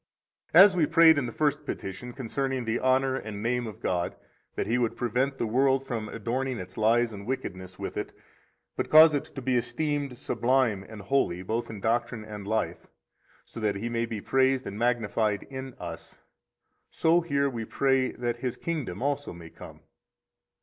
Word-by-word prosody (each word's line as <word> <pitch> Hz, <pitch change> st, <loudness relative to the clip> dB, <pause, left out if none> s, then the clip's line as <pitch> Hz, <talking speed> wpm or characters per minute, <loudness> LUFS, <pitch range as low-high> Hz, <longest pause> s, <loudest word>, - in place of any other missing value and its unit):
49 180 Hz, +5 st, +11 dB
As 200 Hz, -2 st, +2 dB
we 170 Hz, -4 st, +3 dB
prayed 160 Hz, -2 st, +6 dB
in 125 Hz, -, -2 dB
the -, -, -5 dB
First 150 Hz, +2 st, 0 dB
Petition 100 Hz, -3 st, -6 dB
concerning 130 Hz, 0 st, -3 dB
the 115 Hz, +1 st, 0 dB
honor 130 Hz, 0 st, +2 dB
and 105 Hz, -4 st, -6 dB
name 120 Hz, 0 st, 0 dB
of 105 Hz, -, -9 dB
God 90 Hz, -1 st, -1 dB, 0.4 s
that -, -, -1 dB
He 115 Hz, +4 st, +1 dB
would 120 Hz, -2 st, -1 dB
prevent 130 Hz, +4 st, 0 dB
the -, -, -1 dB
world 135 Hz, +4 st, +2 dB
from 115 Hz, -5 st, -4 dB
adorning 125 Hz, +3 st, -2 dB
its 95 Hz, -2 st, -8 dB
lies 115 Hz, +1 st, +2 dB
and 100 Hz, +1 st, -9 dB
wickedness 95 Hz, -7 st, -5 dB
with -, -, -5 dB
it, -, -, -3 dB, 0.6 s
but -, -, -2 dB
cause 155 Hz, 0 st, +8 dB
it 145 Hz, -, -1 dB
to 135 Hz, -, -9 dB
be 130 Hz, 0 st, +1 dB
esteemed 135 Hz, +2 st, -2 dB
sublime 120 Hz, -4 st, +1 dB
and 110 Hz, -2 st, -9 dB
holy 95 Hz, -8 st, 0 dB
both 115 Hz, +5 st, -2 dB
in 105 Hz, -3 st, -7 dB
doctrine 115 Hz, 0 st, -1 dB
and 105 Hz, -2 st, -8 dB
life, 110 Hz, +1 st, -2 dB, 0.6 s
so -, -, -10 dB
that 105 Hz, -2 st, 0 dB
He 110 Hz, +4 st, -3 dB
may 115 Hz, 0 st, -1 dB
be 115 Hz, -2 st, -4 dB
praised 130 Hz, +2 st, +2 dB
and 100 Hz, +1 st, -6 dB
magnified 110 Hz, -3 st, 0 dB
in 130 Hz, -1 st, -7 dB
us, 85 Hz, -2 st, -9 dB, 0.7 s
so 165 Hz, +2 st, +3 dB
here 140 Hz, -4 st, +1 dB
we 120 Hz, -4 st, -4 dB
pray 135 Hz, +2 st, +1 dB
that 120 Hz, -1 st, -3 dB
His 125 Hz, 0 st, -3 dB
kingdom 140 Hz, -, -4 dB
also 145 Hz, -3 st, -1 dB
may 85 Hz, -1 st, -11 dB
come. -, -, -12 dB
120 Hz, 185 wpm, -27 LUFS, 110-135 Hz, 0.7 s, 49